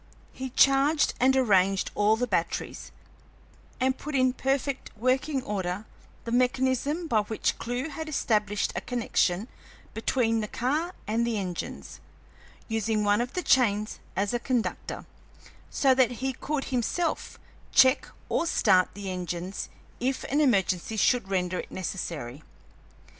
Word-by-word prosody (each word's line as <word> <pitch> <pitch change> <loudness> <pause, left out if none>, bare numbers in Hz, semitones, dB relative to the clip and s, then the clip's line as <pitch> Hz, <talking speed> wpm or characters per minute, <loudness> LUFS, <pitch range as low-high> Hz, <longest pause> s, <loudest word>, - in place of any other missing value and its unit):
He 260 0 -5
charged 275 +4 +4
and 265 +2 +4
arranged 195 -6 +3
all 210 +1 +3
the 245 +3 0
batteries - - -2 0.9
and 260 0 +1
put 300 0 -5
in 255 -1 +3
perfect 270 +1 -1
working 260 +4 +1
order 195 -1 -3 0.4
the 230 - -4
mechanism 260 +6 +1
by 235 -9 +2
which 215 +1 -2
Clewe 245 +5 -3
had 315 +1 -6
established 210 -7 0
a - - -2
connection 225 -5 0 0.5
between 225 0 +1
the 210 - -2
car 300 - -1
and 225 +2 0
the 235 -2 0
engines, 180 -4 -5 0.7
using 220 -1 0
one 205 +2 +3
of 245 +1 -4
the 360 - -2
chains 215 -4 +2 0.2
as 200 +4 0
a 240 - +1
conductor, 245 -1 -2 0.6
so 270 -2 +3
that 255 -2 +3
he 265 +3 -2
could 290 +3 -3
himself 320 +8 -1 0.3
check 260 +1 +5 0.2
or 335 - 0
start 185 - +4
the 200 -2 -5
engines 180 +1 -4 0.3
if 260 +2 -1
an 290 +2 +3
emergency 200 - +1
should 240 -1 +3
render 180 -1 0
it - - -6
necessary. 160 -8 -5
235 Hz, 135 wpm, -27 LUFS, 205-265 Hz, 0.9 s, check